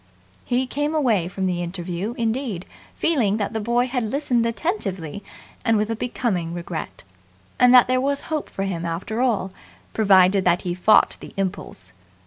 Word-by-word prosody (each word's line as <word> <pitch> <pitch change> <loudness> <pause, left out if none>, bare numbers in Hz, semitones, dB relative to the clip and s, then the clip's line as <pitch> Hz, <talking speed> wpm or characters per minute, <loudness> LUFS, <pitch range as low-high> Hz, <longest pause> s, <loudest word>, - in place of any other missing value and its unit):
He 250 +1 0
came 290 +4 -2
away 225 - +2
from 190 +1 -3
the 180 -1 -1
interview, 175 +5 -4
indeed, 225 -5 -2 0.3
feeling 235 -11 +1
that 210 +1 -2
the 220 - -1
boy 235 +3 +1
had 250 0 -2
listened 245 -3 +1
attentively 205 - -3 0.4
and 225 -3 +3
with 215 +2 0
a - - -1
becoming 200 -8 -2
regret, 170 -1 -6 0.6
and 250 0 +6
that 250 - +7
there 255 0 +2
was 280 +1 0
hope 310 -2 -4
for 195 - -4
him 180 -4 -3
after 175 +8 -3
all, 220 -7 0 0.4
provided 195 -2 +4
that 175 -1 +2
he 175 - -2
fought 185 +4 +4
the - - -11
impulse. 185 - -4
215 Hz, 165 wpm, -23 LUFS, 180-250 Hz, 0.6 s, that